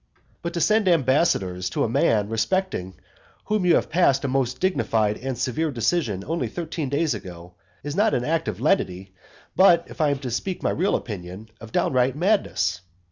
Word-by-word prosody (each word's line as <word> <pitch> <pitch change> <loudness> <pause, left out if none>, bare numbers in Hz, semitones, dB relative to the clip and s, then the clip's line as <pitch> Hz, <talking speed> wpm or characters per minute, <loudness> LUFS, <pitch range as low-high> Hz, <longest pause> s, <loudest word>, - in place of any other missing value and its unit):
II. - - -37 0.2
But 170 0 -4
to 170 - -1
send 215 +5 +3
ambassadors 130 - +2
to - - -1
a - - +1
man 115 -4 +2
respecting 110 - -1 0.5
whom 210 -4 0
you 175 - +5
passed 140 -6 +2
a - - +1
most 130 -1 -1
dignified 110 - +1
and 130 0 -4
severe 140 +6 -1
decision 115 - -1
only 165 +2 -2
thirteen 160 -4 -4
days 145 +1 +1
ago, 90 -4 -9 0.3
is 145 +1 -4
not 210 +3 +2
an 125 - -1
act 165 -1 0
of 105 -3 -3
lenity, 95 - 0 0.4
but, 170 -2 +5
if - - -6
I 150 - +3
am 140 - 0
to 130 -2 -6
speak 185 +10 -3
my - - +1
real 190 +4 +1
opinion, 95 0 -6
of 110 0 -10
downright 130 +2 +1
madness. 150 - 0
135 Hz, 185 wpm, -24 LUFS, 110-170 Hz, 0.5 s, you